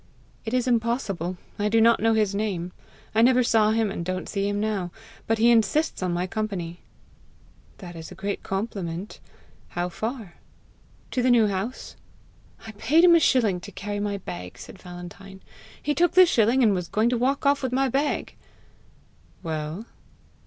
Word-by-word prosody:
"It 225 +2 -2
is 250 0 +1
impossible; 225 -7 -1 0.2
I 210 +1 +1
do 225 +1 +3
not 230 +1 +5
know 225 +1 +2
his 210 -2 +1
name. 195 -4 -2 0.4
I 220 - +3
never 250 +1 +5
saw 220 -2 +3
him, 220 -2 +1
and 180 - -4
don't 185 +1 -3
see 200 -1 -1
him 205 0 -1
now. 205 -4 -1 0.4
But 225 - +2
he 230 +2 +5
insists 230 +7 +2
on 180 -1 0
my 175 +1 -1
company." 185 -4 -4 1.0
"That 175 -3 -10
is 160 -1 -9
a - - -9
great 200 +1 -4
compliment. 195 -2 -4 0.5
How 175 +1 -3
far?" 220 -1 -5 0.7
"To 255 - 0
the 255 - +2
New 235 -3 +5
House." 200 +5 -4 0.7
"I 220 - -7
paid 290 +10 +3
him 355 -1 +8
a 335 - +7
shilling 225 - +2
to - - -10
carry 205 +1 -5
my 205 0 -2
bag," 90 - -8
said 190 - -12
Valentine. 180 +2 -10 0.4
"He 295 - -1
took 350 +3 +2
the 370 0 +8
shilling, 245 -4 +3
and 215 -3 +4
was 180 -2 -2
going 220 +6 +1
to 245 - 0
walk 275 +4 0
off 280 0 +3
with 260 -2 -2
my 270 +1 +2
bag!" 275 +4 -1 1.1
"Well?" 160 +4 -4
215 Hz, 175 wpm, -25 LUFS, 185-240 Hz, 1.1 s, him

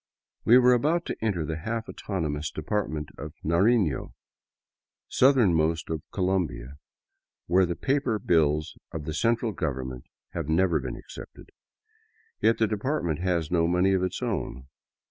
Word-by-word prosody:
We 120 - +8
were 125 0 +6
about 155 +8 +1
to - - -3
enter 95 -8 0
the 80 +1 -3
half 110 +7 -4
autonomous 75 -6 -3
Department 80 -2 -3
of 75 +2 -7
Narino, 90 - +2 0.9
southernmost 85 - +3
of 80 -2 -2
Colombia, 85 -9 -1 0.7
where 90 +1 +3
the 85 - -2
paper 135 -2 0
bills 75 -5 +1 0.2
of 80 -2 -5
the 80 - -3
central 115 +5 +1
government 65 -8 -4 0.3
have 70 - -4
never 85 0 +3
been 65 -3 -5
accepted. - - -11 0.9
Yet 115 - +3
the 110 - +3
department 105 - -1
has 85 -3 -1
no 85 -2 +3
money 90 +3 +3
of 95 - +2
its 95 - -2
own. 65 0 -3
85 Hz, 140 wpm, -27 LUFS, 75-110 Hz, 0.9 s, We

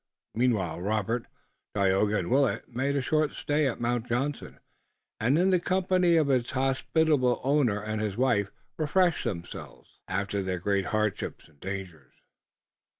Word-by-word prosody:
Meanwhile 105 -9 0
Robert, 110 +4 -1 0.5
Tayoga 100 +1 +2
and 85 - -3
Willet 135 0 +2
made 135 +3 0
a 140 - 0
short 155 +1 +1
stay 150 0 0
at 125 - -3
Mount 120 0 -1
Johnson, 135 +4 -3 0.6
and 125 +7 +2
in 185 +3 +3
the 180 - +4
company 185 -1 +2
of 150 -3 +3
its 125 -2 +1
hospitable 135 0 +1
owner 135 -6 +2
and 110 +1 -3
his 105 -1 -2
wife 115 -6 +2 0.3
refreshed 170 +3 +2
themselves 85 -2 -7
after 100 +1 -1
their 95 -1 -2
great 100 +2 0
hardships 110 -2 -2
and 75 -2 -26
dangers. 90 -8 -7
120 Hz, 145 wpm, -28 LUFS, 100-145 Hz, 0.6 s, the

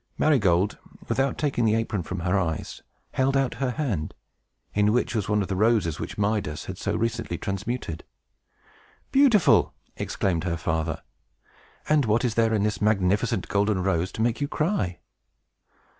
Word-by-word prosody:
Marygold, 105 - +2 0.3
without 135 0 0
taking 140 -5 0
the 110 -1 +3
apron 110 -3 -1
from 90 +2 -5
her 90 +3 +1
eyes, 80 -5 -2 0.3
held 135 +1 +1
out 135 -3 +1
her 135 - +1
hand, 120 - -2 0.6
in 105 0 +3
which 125 - +1
was 105 -4 -2
one 105 -1 +2
of - - -5
the 95 - -2
roses 105 -6 +2
which - - -6
Midas 100 -7 -1
had 95 +1 -7
so - - -1
recently 115 -5 -2
transmuted. 100 -3 -4 1.1
"Beautiful!" 260 - +4 0.2
exclaimed 85 -4 -1
her 85 -2 -1
father. 80 -1 -2 0.8
"And 150 -3 +3
what 110 +3 +2
is 120 - 0
there 115 0 +2
in 100 - +1
this 105 0 -1
magnificent 105 +1 +1
golden 100 -2 +1
rose 90 -1 0
to 110 - -1
make 120 +3 0
you 140 - +1
cry?" 150 - -1
105 Hz, 160 wpm, -25 LUFS, 95-120 Hz, 1.1 s, Beautiful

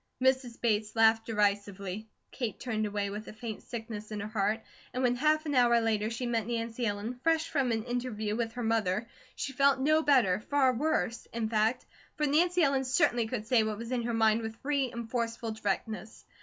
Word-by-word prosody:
Mrs. 260 -2 +1
Bates 215 -2 0
laughed 225 0 +4
derisively. 205 -1 -1 0.2
Kate 235 -7 -4
turned 215 -4 -1
away 205 -1 -2
with 210 +2 -6
a - - -8
faint 220 0 -6
sickness 225 -3 -7
in 215 -1 -4
her 205 - -4
heart 215 +1 0 0.3
and 255 - 0
when 245 -1 +3
half 310 +4 +2
an 295 - -2
hour 240 -2 +5
later 220 -2 0
she 230 +2 -4
met 230 -3 -1
Nancy 235 0 -2
Ellen, 210 +4 -3
fresh 325 +2 +2
from 275 -6 0
an 225 -1 0
interview 240 -3 -2
with 225 -1 -2
her 245 - -4
mother, 220 -1 0 0.3
she 270 - -4
felt 275 +1 +4
no 310 +4 +3
better 250 -12 +4
far 265 +2 +2
worse, 245 -3 -1
in 230 -1 -2
fact 220 +3 +1 0.3
for 300 - 0
Nancy 345 +4 +3
Ellen 275 -2 +2
certainly 255 -4 +2
could 220 -2 -4
say 230 0 +4
what 215 -1 -2
was 230 +2 -7
in 250 -2 0
her 235 0 -2
mind 220 0 +3
with 225 0 -5
free 275 -3 0
and 235 -1 -6
forceful 230 -1 -2
directness. 215 +1 -4
230 Hz, 200 wpm, -30 LUFS, 215-255 Hz, 0.3 s, hour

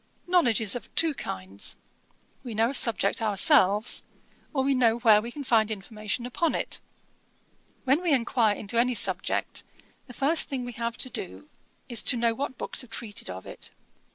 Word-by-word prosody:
Knowledge 335 - +2
is 210 -1 +2
of 245 - -7
two 325 -2 +4
kinds. 95 - -6 0.7
We 240 -4 -7
know 225 +3 +2
a - - -7
subject 225 -5 +2
ourselves, 205 0 +4 0.5
or 270 -3 0
we 275 +1 +2
know 235 -3 +2
where 220 -3 +5
we 235 - -6
can 285 +3 -7
find 225 -4 +2
information 215 +3 -4
upon 310 +7 -1
it. - - -2 1.0
When 275 +5 +2
we 350 -3 0
enquire 235 -4 +2
into 215 +3 -3
any 250 +1 +2
subject, - - +1 0.4
the 250 - -11
first 290 +6 +2
thing 260 -3 -4
we 245 - -5
have 235 0 -4
to 255 - -2
do 295 +10 -6 0.4
is 235 -4 +2
to 250 - +5
know 230 -1 +1
what 260 +1 -5
books - - 0
have 250 - -6
treated 225 -2 -4
of 95 +1 -8
it. - - -8
235 Hz, 180 wpm, -26 LUFS, 215-265 Hz, 1.0 s, where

